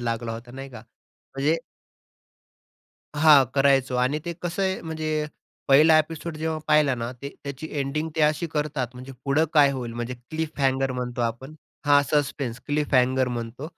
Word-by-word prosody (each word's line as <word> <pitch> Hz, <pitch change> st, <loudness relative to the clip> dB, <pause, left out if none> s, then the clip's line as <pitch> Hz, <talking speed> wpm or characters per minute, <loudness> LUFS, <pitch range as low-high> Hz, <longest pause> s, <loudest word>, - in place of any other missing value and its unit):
लागला 115 Hz, -1 st, -2 dB
होता 115 Hz, +2 st, -9 dB
नाही 135 Hz, +2 st, -8 dB
का 120 Hz, -, -10 dB
म्हणजे 135 Hz, +6 st, -4 dB, 1.6 s
हां, 150 Hz, -2 st, +7 dB
करायचो 135 Hz, -2 st, +3 dB
आणि 130 Hz, +4 st, +1 dB
ते 170 Hz, -, -3 dB
कसं 175 Hz, +2 st, -2 dB
आहे 190 Hz, 0 st, 0 dB
म्हणजे 155 Hz, -1 st, -2 dB, 0.4 s
पहिला 155 Hz, +3 st, +7 dB
एपिसोड 160 Hz, +1 st, -3 dB
जेव्हा 160 Hz, 0 st, -2 dB
पाहिला 150 Hz, -3 st, +4 dB
ना, 120 Hz, 0 st, -4 dB
ते 135 Hz, +3 st, -8 dB, 0.2 s
त्याची 140 Hz, +2 st, -6 dB
एंडिंग 145 Hz, +3 st, -2 dB
ते -, -, +1 dB
अशी 150 Hz, +3 st, +2 dB
करतात, 150 Hz, -4 st, -2 dB
म्हणजे 130 Hz, +2 st, -9 dB
पुढं 145 Hz, +3 st, +3 dB
काय 145 Hz, -2 st, +6 dB
होईल, 125 Hz, -3 st, -5 dB
म्हणजे 120 Hz, +2 st, -4 dB
क्लिफ 155 Hz, +6 st, -6 dB
हँगर 135 Hz, -1 st, +1 dB
म्हणतो 125 Hz, -1 st, -4 dB
आपण 120 Hz, +6 st, -4 dB, 0.3 s
हां, 145 Hz, 0 st, +6 dB
सस्पेन्स, 140 Hz, -4 st, -1 dB
क्लिफ 145 Hz, 0 st, -1 dB
हँगर 130 Hz, 0 st, +3 dB
म्हणतो 120 Hz, +2 st, -5 dB
140 Hz, 160 wpm, -25 LUFS, 125-155 Hz, 1.6 s, हां